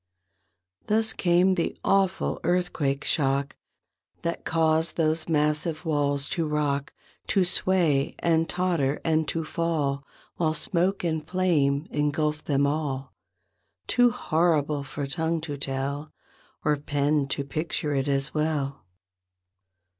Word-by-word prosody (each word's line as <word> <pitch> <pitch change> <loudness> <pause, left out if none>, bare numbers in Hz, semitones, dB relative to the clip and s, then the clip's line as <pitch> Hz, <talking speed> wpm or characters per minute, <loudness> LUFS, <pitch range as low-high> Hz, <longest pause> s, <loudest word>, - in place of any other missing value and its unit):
Thus 220 +1 +2
came 180 +1 +3
the 170 -3 -1
awful 195 -1 +1
earthquake 165 -6 0
shock 140 -2 +1 0.7
That 170 0 -2
caused 160 0 +1
those 160 0 0
massive 150 +2 +1
walls 145 -2 0
to 165 -2 -1
rock. 145 -2 -1 0.4
To 190 -2 +3
sway 170 -6 +2
and 165 -1 +1
totter 170 -6 0
and 160 -1 +2
to 165 - -1
fall. 150 -4 -1 0.3
While 160 -2 +1
smoke 180 +5 0
and 160 -2 -1
flame 155 -5 +1
engulfed 150 +1 0
them 140 -1 +2
all. 140 -3 -2 0.7
Too 245 - +4
horrible 155 -7 +1
for 140 +1 -5
tongue 160 +3 -1
to 150 -2 -5
tell 140 +2 -3 0.5
Or 150 -1 +3
pen 145 0 0
to 140 0 -2
picture 150 +1 -2
it 135 0 0
as 135 0 +1
well. 150 -3 -1
155 Hz, 120 wpm, -26 LUFS, 140-170 Hz, 0.7 s, Too